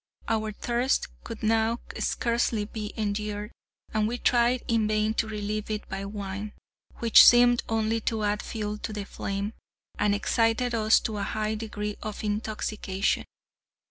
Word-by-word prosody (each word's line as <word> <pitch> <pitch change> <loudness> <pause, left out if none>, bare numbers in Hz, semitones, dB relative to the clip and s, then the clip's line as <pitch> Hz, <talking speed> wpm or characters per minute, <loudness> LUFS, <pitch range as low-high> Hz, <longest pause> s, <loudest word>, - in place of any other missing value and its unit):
Our 220 -1 0
thirst 240 +5 0
could 230 -2 -8
now 225 +1 +2 0.2
scarcely 235 -2 0
be 210 0 -6
endured, 210 0 -2 0.4
and 215 -1 +2
we 240 +2 -2
tried 240 0 +2
in 225 -2 +2
vain 215 0 +1
to 225 - 0
relieve 210 0 -3
it 215 -1 -3
by 195 - -4
wine, 200 0 -5 0.4
which 230 -2 +7
seemed 245 0 +7
only 225 0 +1
to 220 -2 -2
add 205 0 0
fuel 210 -2 -4
to 215 - -5
the 205 -1 -4
flame, 200 +2 -4 0.5
and 205 -1 +3
excited 230 +3 +1
us 220 -1 +4
to 220 -3 -3
a - - -2
high 215 +2 -1
degree 210 -1 -4
of 215 0 -5
intoxication. 210 -2 -1
215 Hz, 150 wpm, -27 LUFS, 210-225 Hz, 0.5 s, which